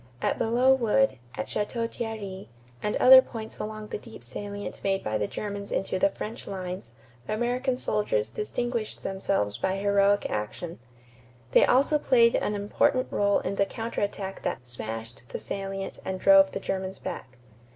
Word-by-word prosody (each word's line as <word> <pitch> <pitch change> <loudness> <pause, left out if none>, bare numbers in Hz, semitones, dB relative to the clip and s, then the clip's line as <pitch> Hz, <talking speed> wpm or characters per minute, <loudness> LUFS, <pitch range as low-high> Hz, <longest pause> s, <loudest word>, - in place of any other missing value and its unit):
At - - 0
Belleau 245 +4 +4
Wood, 265 - +2 0.2
at 110 - -3
Château 230 +2 -2
Thierry, 215 - -6 0.3
and 210 - -1
other 260 +1 +9
points 225 -4 -8
along 215 0 -5
the - - -4
deep 225 0 -11
salient 205 0 -6
made 195 -1 0
by 110 0 -1
the 105 - 0
Germans 200 - -5
into 190 -1 -1
the 295 - +4
French 225 -5 -7
lines, 185 -10 -6 0.3
American 250 +3 0
soldiers 205 - 0
distinguished 230 - -3
themselves 190 - -1
by 190 0 0
heroic 200 0 +3
action. 105 +11 -4 0.7
They - - +6
also 280 +4 +4
played 235 -4 +5
an 210 - 0
important 205 +5 +1
rôle 200 0 +2
in 200 - -2
the 200 - +4
counter 225 +3 -4
attack 195 -1 -3
that 125 - -3
"smashed" 115 -1 -5
the - - -4
salient 195 0 -5
and 190 0 -3
drove 290 +3 +7
the - - -2
Germans 190 0 -3
back. 130 0 -7
205 Hz, 160 wpm, -27 LUFS, 190-230 Hz, 0.7 s, other